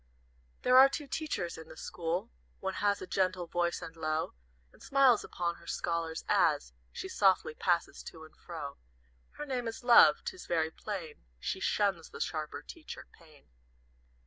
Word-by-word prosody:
"There 255 +1 +7
are 270 +1 +9
two 290 +2 -4
Teachers 275 - -3
in 160 - -10
the - - -12
school, 175 +6 -3 0.3
One 190 0 -2
has 205 0 +1
a - - -4
gentle 185 -1 0
voice 170 0 -1
and 165 - -8
low, 155 -1 -1 0.4
And - - -21
smiles 270 -5 +4
upon 170 -1 -3
her - - -17
scholars, 165 -1 -2
as 60 +1 +2 0.2
She 190 - -6
softly 190 -4 +3
passes 170 +1 0
to 160 -2 -9
and 155 - -15
fro. 150 -5 -7 0.6
Her 295 - -6
name 250 -4 -2
is 225 +2 -6
Love; 240 -1 +7
'tis 370 - -6
very 160 -1 +1
plain 175 -5 -6 0.2
She 190 - -3
shuns 195 -5 0
the - - -10
sharper 155 -2 -3
teacher, 330 -2 -9
Pain. 155 -4 -20
175 Hz, 165 wpm, -32 LUFS, 160-225 Hz, 0.6 s, are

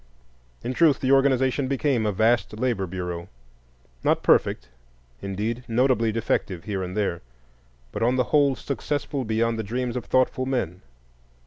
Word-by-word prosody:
In 125 - -2
truth, 155 -1 +4
the 130 - 0
organization 135 0 +3
became 135 -4 +1
a - - +1
vast 110 +2 +1
labor 115 -6 -1
bureau,—not 60 -9 -5
perfect, - - +3 0.5
indeed, 105 +5 -3
notably 115 -1 +2
defective 105 -5 -1
here 100 -3 -3
and 90 +2 -5
there, 100 -5 -1 0.7
but - - -5
on 120 +3 +3
the 130 - +2
whole 140 -3 +4
successful 140 +1 -3
beyond 115 +1 0
the - - -1
dreams 120 +3 -3
of 125 - -4
thoughtful 130 0 +1
men. 120 -10 -2
115 Hz, 140 wpm, -25 LUFS, 95-130 Hz, 0.7 s, truth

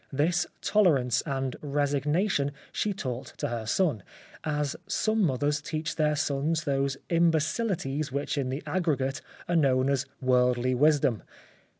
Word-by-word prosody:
This 165 +6 +1
tolerance 140 - +3
and 135 -2 -2
resignation 145 +2 0 0.2
she 210 - -1
taught 130 -9 -5
to - - -2
her 115 -2 -4
son, 145 - +1 0.4
as 150 -2 -1
some 220 0 +1
mothers 145 -1 +1
teach 155 +1 -3
their 150 -1 +2
sons 155 +2 0
those 140 -2 0
imbe 165 -1 +4
cilities 155 - -2
which 140 +3 -2
in 135 -3 -1
the 135 +4 -4
aggregate 145 -7 -1 0.3
are 175 - 0
known 135 -3 +3
as 135 -1 0
worldly 125 -1 +2
wisdom. 140 -4 +3
145 Hz, 135 wpm, -28 LUFS, 130-160 Hz, 0.4 s, imbe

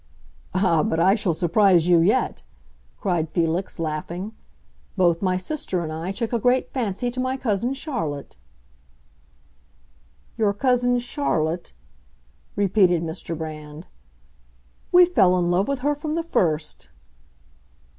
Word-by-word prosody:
"Ah, 185 -4 +3
but 160 - -1
I 190 +3 +5
shall 200 -6 0
surprise 175 0 +3
you 175 -1 +5
yet!" 165 - +1 0.6
cried 165 - -1
Felix, 170 +3 -1
laughing. 165 +5 -4 0.7
"Both 175 -3 +3
my 185 -2 +1
sister 185 - -3
and 155 -1 -5
I 165 +4 -4
took 225 +4 -3
a 235 - +1
great 250 +3 +1
fancy 245 -1 -2
to 255 - -6
my 255 +1 -1
cousin 235 +1 -1
Charlotte." 165 - -4 2.0
"Your 210 -2 +2
cousin 245 +2 +2
Charlotte?" 175 - -1 0.8
repeated 190 -4 +3
Mr. 165 0 -5
Brand. 155 0 -8 1.1
"We 360 0 +8
fell 195 - +3
in 175 -1 +1
love 185 +3 +1
with 280 -2 -2
her 290 +2 +1
from 300 +1 -4
the 335 - -1
first!" 160 - -1
185 Hz, 125 wpm, -23 LUFS, 165-245 Hz, 2.0 s, We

